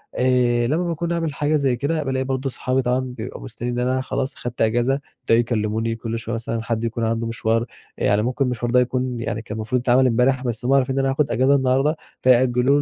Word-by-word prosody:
آآ 125 Hz, -2 st, +2 dB
لما 160 Hz, +6 st, +1 dB
باكون 170 Hz, +1 st, -2 dB
عامل 165 Hz, -3 st, -1 dB
حاجة 150 Hz, +2 st, 0 dB
زي 135 Hz, -4 st, +2 dB
كده 150 Hz, +5 st, -1 dB
بالاقي 130 Hz, -1 st, -1 dB
برضه 135 Hz, 0 st, -2 dB
صحابي 130 Hz, +1 st, -1 dB
طبعًا 125 Hz, +1 st, +1 dB
بيبقوا 125 Hz, -2 st, -6 dB
مستنيين 120 Hz, 0 st, -4 dB
إن 125 Hz, -, 0 dB
أنا 130 Hz, 0 st, +1 dB
خلاص، 130 Hz, +1 st, -3 dB
خدت 120 Hz, 0 st, -6 dB
أجازة، 120 Hz, +5 st, +2 dB, 0.2 s
يبدأوا 115 Hz, +1 st, +4 dB
يكلّموني 115 Hz, -1 st, -1 dB
كل 115 Hz, 0 st, -4 dB
شويّة 115 Hz, 0 st, -5 dB
مثلًا 115 Hz, 0 st, -3 dB
حد 115 Hz, -1 st, -2 dB
يكون 115 Hz, 0 st, -2 dB
عنده 115 Hz, 0 st, -1 dB
مشوار، 115 Hz, 0 st, 0 dB, 0.3 s
يعني 105 Hz, +1 st, +2 dB
ممكن 125 Hz, +4 st, 0 dB
المشوار 120 Hz, -1 st, -2 dB
ده 125 Hz, -, +5 dB
يكون 125 Hz, 0 st, -1 dB
يعني 110 Hz, -1 st, -3 dB
كان 110 Hz, -1 st, -7 dB
المفروض 115 Hz, +3 st, -1 dB
يتعمل 130 Hz, +1 st, +4 dB
امبارح 125 Hz, +2 st, +2 dB
بس 120 Hz, -1 st, -3 dB
هُم 135 Hz, -, +3 dB
عارفين 135 Hz, -1 st, +2 dB
إن -, -, +1 dB
أنا 135 Hz, 0 st, +1 dB
هاخُد 145 Hz, +2 st, 0 dB
أجازة 130 Hz, +3 st, +3 dB
النهارده 135 Hz, +3 st, +2 dB, 0.2 s
فيأجّلوه 130 Hz, +2 st, +4 dB
125 Hz, 215 wpm, -22 LUFS, 115-135 Hz, 0.3 s, ده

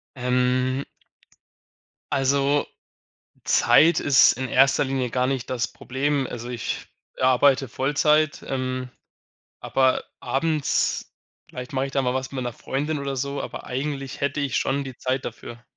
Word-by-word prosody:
Ähm 125 Hz, +1 st, +1 dB, 1.3 s
Also, 140 Hz, +1 st, +2 dB, 0.8 s
Zeit 165 Hz, +3 st, +5 dB
ist 140 Hz, -2 st, +6 dB
in 130 Hz, +1 st, -4 dB
erster 135 Hz, +3 st, +4 dB
Linie 130 Hz, -3 st, -1 dB
gar 125 Hz, +1 st, +1 dB
nicht 130 Hz, -2 st, -2 dB
das 125 Hz, -2 st, -1 dB
Problem. 135 Hz, +1 st, -2 dB
Also, 120 Hz, 0 st, -7 dB
ich 120 Hz, -2 st, -4 dB, 0.3 s
arbeite 130 Hz, +1 st, +4 dB
Vollzeit, 150 Hz, +4 st, +1 dB
ähm, 130 Hz, -1 st, -3 dB, 0.7 s
aber 130 Hz, -1 st, +2 dB, 0.2 s
abends 155 Hz, 0 st, 0 dB, 0.4 s
vielleicht 125 Hz, +3 st, -8 dB
mache 135 Hz, -1 st, 0 dB
ich 135 Hz, -, -6 dB
da 135 Hz, -, +2 dB
mal 125 Hz, -1 st, 0 dB
was 130 Hz, 0 st, -3 dB
mit 130 Hz, -2 st, -3 dB
meiner 120 Hz, -, -3 dB
Freundin 145 Hz, +5 st, -3 dB
oder 140 Hz, -1 st, -3 dB
so, 140 Hz, +2 st, -3 dB
aber -, -, -7 dB
eigentlich 135 Hz, +1 st, -4 dB
hätte 140 Hz, +1 st, -1 dB
ich 140 Hz, -4 st, 0 dB
schon 140 Hz, +1 st, 0 dB
die 130 Hz, -2 st, -9 dB
Zeit 130 Hz, 0 st, -1 dB
dafür. 120 Hz, 0 st, -8 dB
135 Hz, 140 wpm, -24 LUFS, 125-140 Hz, 1.3 s, ist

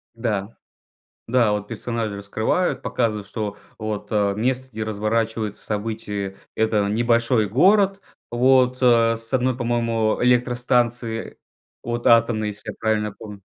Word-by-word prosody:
Да, 110 Hz, -3 st, -3 dB, 0.7 s
да, 120 Hz, -3 st, +3 dB
вот 105 Hz, -1 st, -2 dB
персонажи 115 Hz, -2 st, -3 dB
раскрывают, 110 Hz, -, -1 dB
показывают, 105 Hz, -4 st, -1 dB
что 105 Hz, -1 st, -4 dB, 0.2 s
вот, 110 Hz, -1 st, -4 dB
а, 100 Hz, -2 st, +1 dB
место, 130 Hz, +4 st, -1 dB
где 110 Hz, -2 st, -4 dB
разворачиваются 110 Hz, 0 st, -2 dB
события- 105 Hz, -2 st, -4 dB, 0.2 s
это 110 Hz, -2 st, +1 dB
небольшой 115 Hz, 0 st, +2 dB
город, 195 Hz, -, +3 dB, 0.3 s
вот, 130 Hz, +1 st, +3 dB
а, 115 Hz, -2 st, +4 dB
с 115 Hz, +2 st, -6 dB
одной, 130 Hz, -1 st, +1 dB
по 120 Hz, -, -4 dB
моему, 115 Hz, -2 st, 0 dB
электростанции 120 Hz, -2 st, +1 dB, 0.4 s
вот 120 Hz, +1 st, -3 dB
атомной, 115 Hz, -2 st, +4 dB
если 105 Hz, +1 st, -8 dB
я -, -, -9 dB
правильно 105 Hz, -1 st, 0 dB
помню. 105 Hz, -1 st, -11 dB
115 Hz, 130 wpm, -22 LUFS, 105-120 Hz, 0.7 s, а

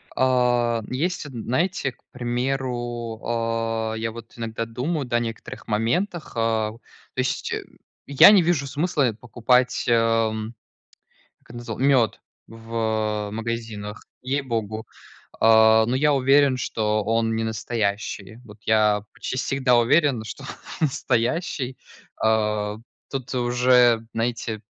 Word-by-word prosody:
А, 120 Hz, -2 st, +2 dB
есть, 170 Hz, +7 st, -2 dB
вот 145 Hz, -, -9 dB
знаете, 135 Hz, -, -1 dB
к -, -, -34 dB
примеру, 120 Hz, -2 st, -3 dB
а, 115 Hz, -1 st, -1 dB
я 115 Hz, 0 st, -3 dB
вот 115 Hz, +1 st, -11 dB
иногда 115 Hz, 0 st, -3 dB
думаю, 135 Hz, +6 st, -3 dB
да, 120 Hz, -1 st, 0 dB
о -, -, +2 dB
некоторых 115 Hz, -2 st, -6 dB
моментах, 125 Hz, -, -1 dB
а, 110 Hz, -2 st, 0 dB
то 110 Hz, -, -13 dB, 0.4 s
есть, 130 Hz, 0 st, -1 dB
э, -, -, -3 dB, 0.4 s
я 140 Hz, +8 st, +8 dB
не 200 Hz, -, +6 dB
вижу 165 Hz, -4 st, +1 dB
смысла 145 Hz, -3 st, +1 dB
покупать, 125 Hz, +1 st, +1 dB
ам, 115 Hz, -1 st, +1 dB, 0.9 s
как -, -, -26 dB
я 120 Hz, -, -9 dB
называл, 120 Hz, -, -6 dB
мед 130 Hz, -5 st, +3 dB, 0.3 s
в, 115 Hz, 0 st, -14 dB
а, 110 Hz, -2 st, -1 dB
магазинах, 115 Hz, -2 st, -5 dB, 0.2 s
ей-богу, 115 Hz, -5 st, -2 dB, 0.5 s
а, 110 Hz, 0 st, +6 dB
ну, 120 Hz, -, 0 dB
я 145 Hz, +2 st, +3 dB
уверен, 135 Hz, 0 st, +4 dB
что 110 Hz, -3 st, -1 dB
он 115 Hz, +1 st, +1 dB
не 115 Hz, -, -1 dB
настоящий. 110 Hz, -1 st, -3 dB
Вот 105 Hz, -2 st, -14 dB
я 105 Hz, -1 st, +3 dB
почти -, -, -5 dB
всегда 130 Hz, -1 st, +2 dB
уверен, 125 Hz, -1 st, +3 dB
что 110 Hz, -, -8 dB
он -, -, -8 dB, 0.3 s
не -, -, +6 dB
настоящий, 130 Hz, +1 st, -1 dB, 0.4 s
а. 105 Hz, -1 st, +1 dB, 0.3 s
Тут 130 Hz, -3 st, -5 dB
уже, 120 Hz, -1 st, +4 dB
знаете, 115 Hz, -1 st, -2 dB
115 Hz, 130 wpm, -23 LUFS, 110-130 Hz, 0.9 s, я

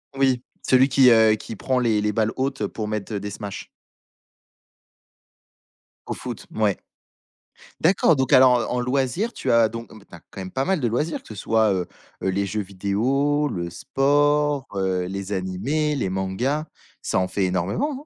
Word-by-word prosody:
Oui, 130 Hz, -2 st, +2 dB, 0.2 s
celui 130 Hz, +1 st, +4 dB
qui, 130 Hz, -1 st, +6 dB
heu, 110 Hz, -2 st, +6 dB
qui 110 Hz, +1 st, -8 dB
prend 130 Hz, +4 st, 0 dB
les 115 Hz, -3 st, +2 dB
les 105 Hz, 0 st, 0 dB
balles 110 Hz, 0 st, +1 dB
hautes 130 Hz, -5 st, -1 dB
pour 110 Hz, -2 st, -5 dB
mettre, 105 Hz, 0 st, -4 dB
heu, 100 Hz, -, -1 dB
des 105 Hz, 0 st, -6 dB
smashs. 100 Hz, -2 st, -7 dB, 2.4 s
Au -, -, -2 dB
foot, -, -, -7 dB
mouais. -, -, +1 dB, 1.1 s
D'accord 165 Hz, -2 st, +4 dB
donc 130 Hz, 0 st, -1 dB
alors 130 Hz, -1 st, +7 dB, 0.2 s
en 125 Hz, -, -1 dB
en -, -, 0 dB
loisirs, 135 Hz, -, -1 dB
tu 125 Hz, -, -1 dB
as 115 Hz, -1 st, +5 dB
donc 115 Hz, +1 st, -8 dB
mais 110 Hz, -2 st, -14 dB
tu -, -, -16 dB
as 85 Hz, -, -11 dB
quand 95 Hz, -, -9 dB
même 95 Hz, 0 st, -6 dB
pas 135 Hz, +1 st, -1 dB
mal 190 Hz, -4 st, 0 dB
de 120 Hz, -, +1 dB
loisirs 150 Hz, +8 st, -1 dB
que -, -, -18 dB
ce 110 Hz, -, -8 dB
soit, 110 Hz, +1 st, +2 dB
heu, 90 Hz, -2 st, -1 dB, 0.4 s
heu, 95 Hz, -, 0 dB
les 100 Hz, +1 st, -1 dB
jeux 105 Hz, +1 st, -2 dB
vidéos, 130 Hz, +10 st, 0 dB
le 85 Hz, -7 st, -4 dB
sport, 145 Hz, -, +1 dB
heu, 95 Hz, -2 st, 0 dB
les 100 Hz, +2 st, -5 dB
animés, 110 Hz, +12 st, -1 dB
les 130 Hz, -, -1 dB
mangas, 95 Hz, +11 st, -1 dB, 0.4 s
ça -, -, 0 dB
en 95 Hz, 0 st, 0 dB
fait 100 Hz, -, -1 dB
énormément, 95 Hz, -, 0 dB
hein? -, -, -4 dB
115 Hz, 185 wpm, -23 LUFS, 100-135 Hz, 2.4 s, alors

